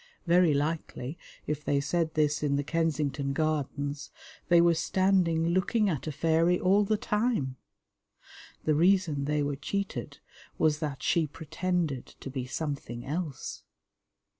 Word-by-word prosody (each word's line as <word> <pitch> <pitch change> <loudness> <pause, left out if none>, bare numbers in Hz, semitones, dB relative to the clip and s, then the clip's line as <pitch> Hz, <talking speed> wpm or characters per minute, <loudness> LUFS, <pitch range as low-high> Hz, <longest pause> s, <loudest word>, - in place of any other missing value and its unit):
Very 175 -3 +4
likely 150 -2 -2 0.3
if 150 0 -3
they 140 -1 +1
said 160 +3 -1
this 150 -1 +2
in 145 -2 +1
the 145 - 0
Kensington 145 -3 -1
Gardens, 145 -1 -2 0.4
they 170 -1 +6
were 170 0 +5
standing 170 -1 +2
looking 195 +4 +2
at 150 -2 -4
a - - -1
fairy 165 +4 +2
all 195 +3 +4
the 215 +1 +1
time. 210 - 0 1.1
The 155 - +2
reason 165 -3 +3
they 150 0 +1
were 145 0 -1
cheated 200 +8 -4 0.4
was 155 -1 +2
that 145 -4 -4
she 165 -3 +2
pretended 160 -1 -2
to 135 - -7
be 130 -2 -4
something 135 -4 -4
else. 150 -1 -4
155 Hz, 140 wpm, -29 LUFS, 145-175 Hz, 1.1 s, they